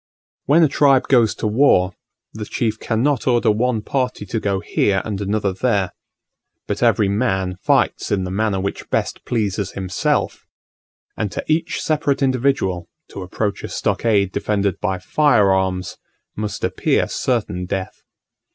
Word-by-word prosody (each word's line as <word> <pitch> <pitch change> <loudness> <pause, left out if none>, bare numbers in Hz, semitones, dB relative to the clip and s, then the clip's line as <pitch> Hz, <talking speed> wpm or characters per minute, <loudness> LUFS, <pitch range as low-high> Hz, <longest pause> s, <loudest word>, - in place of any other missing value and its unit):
When 155 +5 +5
a - - +6
tribe 135 -2 +3
goes 120 -5 +4
to - - -5
war, 105 -5 +3 0.4
the 105 -1 -6
chief 110 0 -2
cannot 125 +3 0
order 120 -3 +3
one 115 0 0
party 125 -5 -2
to 110 +3 -2
go 100 -2 -1
here 95 -1 0
and 105 -2 -4
another 100 -1 -1
there; 100 -2 0 0.7
but - - -3
every 100 - +3
man 95 -4 0
fights - - +1
in 95 -2 +1
the 90 - -4
manner 100 0 0
which 100 +1 -4
best - - -2
pleases 100 -4 -1
himself; 95 -2 -1 0.7
and 105 -3 -2
to - - -3
each 155 +1 0
separate 145 -3 0
individual 125 -9 0 0.2
to 100 - -8
approach 100 +3 -3
a - - -3
stockade 100 -4 +1
defended 100 -2 -1
by 95 -2 -1
fire 105 -2 +3
arms 95 -1 -1 0.4
must 105 -1 -4
appear - - +1
certain 105 -7 -2
death. 95 0 -4
105 Hz, 150 wpm, -20 LUFS, 95-125 Hz, 0.7 s, a